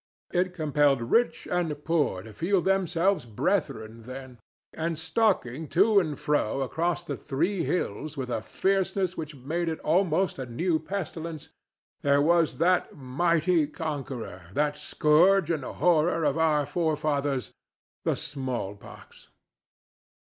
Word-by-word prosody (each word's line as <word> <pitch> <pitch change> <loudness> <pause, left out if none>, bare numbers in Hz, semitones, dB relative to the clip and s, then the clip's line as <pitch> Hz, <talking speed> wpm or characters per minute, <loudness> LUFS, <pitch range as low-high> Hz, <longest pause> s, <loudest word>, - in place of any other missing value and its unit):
It 180 0 +1
compelled 145 -6 +2
rich 240 +1 +2
and 160 -5 -1
poor 150 - +1
to 110 0 -11
feel 185 - +1
themselves 190 -1 +1
brethren 115 - -2
then, 130 -2 -9 0.3
and 165 0 -2
stalking 160 - 0
to 200 +6 +4
and 155 -6 -2
fro 140 -4 0
across 170 +6 -1
the 175 - -4
Three 170 +6 -1
Hills 155 - -2
with 130 -2 -4
a 115 -2 -1
fierceness 190 - 0
which 155 -1 -6
made 160 +6 -2
it 160 - -3
almost 180 0 +1
a 130 - -4
new 160 +7 0
pestilence, 165 -3 -5 0.5
there 140 0 +3
was 165 +2 +3
that 180 +1 +2
mighty 165 +4 +1
conqueror—that 145 - -3
scourge 165 +4 +3
and 155 -4 -1
horror 165 +2 +2
of 145 -2 +2
our 155 -3 +2
forefathers—the 145 -5 -2
small 130 -7 -4
pox. 100 - -15
155 Hz, 125 wpm, -27 LUFS, 135-175 Hz, 0.5 s, to